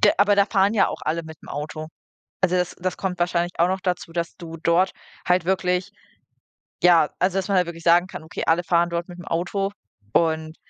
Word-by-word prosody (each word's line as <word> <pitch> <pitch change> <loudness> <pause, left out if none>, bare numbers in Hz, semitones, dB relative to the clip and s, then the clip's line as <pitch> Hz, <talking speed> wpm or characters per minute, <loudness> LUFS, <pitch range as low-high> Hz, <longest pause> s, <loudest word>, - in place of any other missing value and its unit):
g 210 - +6
aber 205 +1 +4
da 200 0 +4
fahren 195 0 +2
ja 215 - +3
auch - - -6
alle 160 +2 -1
mit'm 160 -2 -12
Auto. 155 +1 -5 0.5
Also, 185 -1 +2
das 180 -1 0
das 185 +1 -2
kommt 185 -2 -3
wahrscheinlich 175 0 0
auch 170 - +4
noch 190 +1 -1
dazu, 180 -2 -2
dass 170 0 -3
du 165 -2 -8
dort 170 +3 +3 0.4
halt 180 -1 +3
wirklich 180 0 0 0.9
ja, 170 -4 +5
also, 185 +1 +1
dass 195 +1 -2
man 195 - +3
halt 180 - +3
wirklich 165 -1 -8
sagen 175 +2 +5
kann: 190 - -8
„Okay, 160 - -5
alle 165 +2 +3
fahren 170 0 +2
dort 170 0 -3
mit'm 175 0 -10
Auto“, 190 +4 -1 0.4
und 160 -1 +1
175 Hz, 210 wpm, -23 LUFS, 165-185 Hz, 0.9 s, g